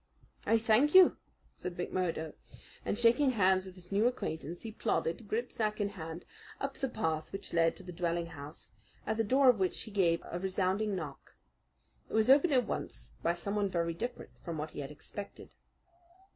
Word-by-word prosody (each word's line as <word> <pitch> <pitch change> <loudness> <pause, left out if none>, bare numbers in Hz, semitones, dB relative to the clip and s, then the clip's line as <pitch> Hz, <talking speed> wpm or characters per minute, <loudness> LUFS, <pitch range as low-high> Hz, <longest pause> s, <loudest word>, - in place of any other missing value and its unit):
"I 225 - +5
thank 230 +8 +3
you," 375 -1 +8 0.4
said 180 -1 -6
McMurdo, 175 -3 -2 0.5
and - - -1
shaking 240 +4 +4
hands 190 -3 +3
with 185 -1 -10
his 180 0 -11
new 205 +4 +3
acquaintance 170 - -3
he 225 - -5
plodded, 210 -2 -1
gripsack 220 -1 -1
in 205 -1 +1
hand, 165 -3 -7 0.3
up 275 0 -2
the 270 - -3
path 160 -9 -2
which 195 0 -6
led 165 -1 +3
to - - -11
the 180 - -8
dwelling 170 -1 -1
house, 150 -2 -10 0.3
at 220 - -1
the 225 - +2
door 265 +5 +4
of 245 -5 +6
which 185 -2 0
he 220 - -7
gave 175 -4 +2
a 175 - -4
resounding 190 +2 0
knock. 150 -6 -7 0.7
It - - -11
was 220 +3 +5
opened 290 +3 +5
at 250 -3 +4
once - - -5
by 170 +1 +1
someone 200 +3 -1
very 170 -2 0
different 240 +9 -5
from 170 -3 -4
what 150 +1 -4
he - - -8
had 140 -1 -4
expected. 200 +7 -8
190 Hz, 185 wpm, -32 LUFS, 170-225 Hz, 0.7 s, you